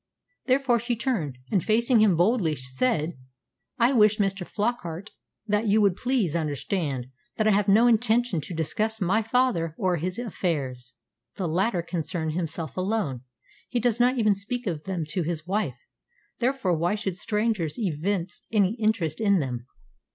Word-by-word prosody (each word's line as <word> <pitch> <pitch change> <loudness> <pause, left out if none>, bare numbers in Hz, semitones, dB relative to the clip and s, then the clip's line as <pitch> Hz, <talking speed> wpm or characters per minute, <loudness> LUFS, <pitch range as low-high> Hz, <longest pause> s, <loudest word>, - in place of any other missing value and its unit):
Therefore 255 -2 +3
she 240 +1 -1
turned, 210 - -2
and, 190 -5 +2
facing 235 +1 +3
him 200 -6 +4
boldly, 180 -3 +2
said, 150 - -1 0.6
"I 240 +2 +4
wish, 215 -3 +5
Mr. 195 -3 -1
Flockart, 205 -3 -3 0.3
that 210 +1 0
you 210 +2 +4
would 200 -4 +3
please 235 - 0
understand 150 -3 -2 0.3
that 215 - +2
I - - +5
have 200 0 +2
no 215 +4 +6
intention 235 -5 +3
to 175 - -7
discuss 215 +8 -1
my 195 +3 +2
father 225 -9 +1
or 185 -2 +1
his 180 +4 -3
affairs. 140 - -3 0.4
The 185 - -2
latter 180 +2 +1
concern 170 -1 -3
himself 165 -2 -4
alone. 185 - -1 0.5
He 245 - 0
does 240 0 +1
not 250 +2 +3
even 215 -3 +4
speak 225 +6 -4
of 160 -6 -3
them 185 -4 -2
to 185 - -1
his 160 -1 -3
wife; 185 - -1 0.6
therefore 245 -8 +1
why 170 +5 +1
should 205 -4 -3
strangers 210 -5 -1
evince 180 -2 -2
any 205 -2 +3
interest 215 -4 0
in 200 -2 +4
them?" 125 -4 -4
195 Hz, 160 wpm, -26 LUFS, 165-225 Hz, 0.6 s, no